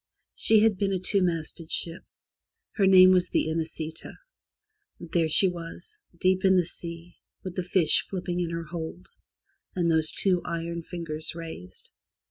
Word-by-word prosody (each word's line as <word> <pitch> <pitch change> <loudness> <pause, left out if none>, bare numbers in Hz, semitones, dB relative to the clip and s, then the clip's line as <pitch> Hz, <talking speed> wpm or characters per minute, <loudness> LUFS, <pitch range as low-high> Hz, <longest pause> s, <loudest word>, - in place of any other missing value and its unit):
She 220 -1 +3
had 220 -3 +2
been 200 -1 0
a - - +1
two 195 +2 +1
masted 165 -2 -3
ship. 170 0 -2 0.7
Her 195 -3 +1
name 185 -1 +8
was 180 -1 +2
the - - 0
Inesita, 160 0 -5 0.9
There 165 -1 -1
she 175 +5 +7
was, 175 - -8 0.2
deep 185 0 +1
in 190 -1 +4
the 180 -2 +3
sea, 170 0 -6 0.3
with 185 -1 -7
the 185 - -1
fish 175 -3 +3
flipping 180 -2 -4
in 175 -2 -2
her 165 0 -4
hold, 165 +2 -8 0.7
and 170 -2 +1
those 160 -1 +3
two 185 -3 +1
iron 170 0 -4
fingers 165 -2 -5
raised. 160 - -9
175 Hz, 155 wpm, -26 LUFS, 165-185 Hz, 0.9 s, name